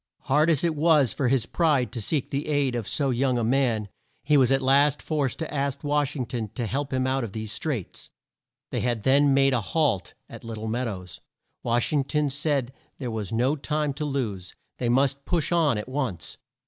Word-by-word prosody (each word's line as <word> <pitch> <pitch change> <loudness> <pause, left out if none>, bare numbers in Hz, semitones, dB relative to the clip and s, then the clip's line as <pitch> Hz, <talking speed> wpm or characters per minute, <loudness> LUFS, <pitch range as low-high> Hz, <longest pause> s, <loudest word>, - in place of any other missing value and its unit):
Hard 150 +4 +2
as 155 -3 +2
it 165 -2 +1
was 150 -5 +4
for 135 - 0
his 125 -2 +2
pride 145 -4 +1
to 120 -2 -4
seek 140 +5 -1
the 140 +2 -2
aid 145 -4 +1
of 115 -4 -3
so 140 -3 0
young 125 0 +1
a 120 - 0
man, 115 -3 +1 0.4
he 150 - +3
was 130 -3 +5
at 135 - +4
last 140 +2 +3
forced 145 -5 -1
to 160 - -5
ask 140 -1 -2
Wash 145 -1 0
ing 130 -4 -2
ton 115 -2 -4
to 120 - -2
help 140 +5 -3
him 130 -1 0
out 130 0 0
of 110 -4 -6
these 110 -1 -4
straits. 130 - -4 0.6
They - - -1
had 120 -3 -1
then 140 +2 +4
made 135 0 +4
a 120 - +2
halt 135 - 0
at - - -11
Lit 115 -1 -6
tle 110 +1 -5
Mead 120 +3 -1
ows. 90 -4 -7 0.4
Wash 120 +4 0
ing 145 -2 +3
ton 150 0 0
said 140 -3 -1 0.2
there 125 -4 -4
was 105 -4 -4
no 125 +6 +2
time 150 0 -1
to 150 +2 -4
lose. 110 -11 -3 0.2
They 120 - 0
must 135 +2 +2
push 170 -3 0
on 160 -9 +3
at 105 - -5
once. 130 - -4
135 Hz, 215 wpm, -26 LUFS, 120-145 Hz, 0.6 s, was